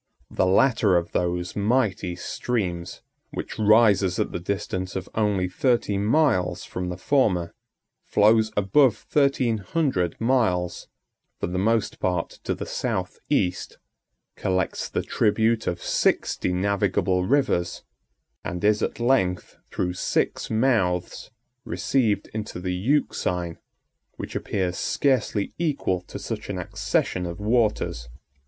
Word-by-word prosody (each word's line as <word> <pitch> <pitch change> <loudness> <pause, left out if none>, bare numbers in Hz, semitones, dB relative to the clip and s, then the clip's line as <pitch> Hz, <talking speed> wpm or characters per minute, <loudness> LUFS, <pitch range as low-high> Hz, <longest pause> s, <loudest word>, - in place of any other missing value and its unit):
The 95 - +1
latter 105 -2 +4
of 85 0 -2
those 90 0 -1
mighty 105 -4 0
streams, 90 -4 -3 0.3
which - - -6
rises 105 -4 +4
at - - -1
the - - -3
distance 95 0 -3
of 95 - -4
only 105 -4 +1
thirty 115 +2 +1
miles 110 - +2
from 90 0 -4
the 90 - -5
former, 95 -8 +1 0.5
flows 110 +1 +4
above 105 +4 +4
thirteen 135 -6 +1
hundred 100 - -1
miles, 110 -8 +1 0.5
for - - -1
the 90 +1 -2
most 110 +2 +1
part 90 -2 -2
to - - 0
the - - -5
south - - -3
east, 90 -1 0 0.6
collects 95 -2 -1
the - - -2
tribute 110 +1 +1
of 90 -1 -2
sixty - - +1
navigable 95 -1 +1
rivers, 125 -10 +1 0.6
and 90 0 -5
is, 105 0 +3
at - - -2
length, 120 -8 +1
through 90 -1 -2
six 90 - -1
mouths, 110 -7 0 0.3
received 115 -6 0
into 110 -4 -5
the 90 0 -2
Euxine, 90 - -1 0.6
which - - -7
appears 95 -3 -2
scarcely 125 -7 0
equal 140 - 0
to - - -9
such - - -6
an - - -3
accession 90 -1 -1
of 85 +2 -6
waters. 105 - 0
100 Hz, 125 wpm, -24 LUFS, 90-115 Hz, 0.6 s, latter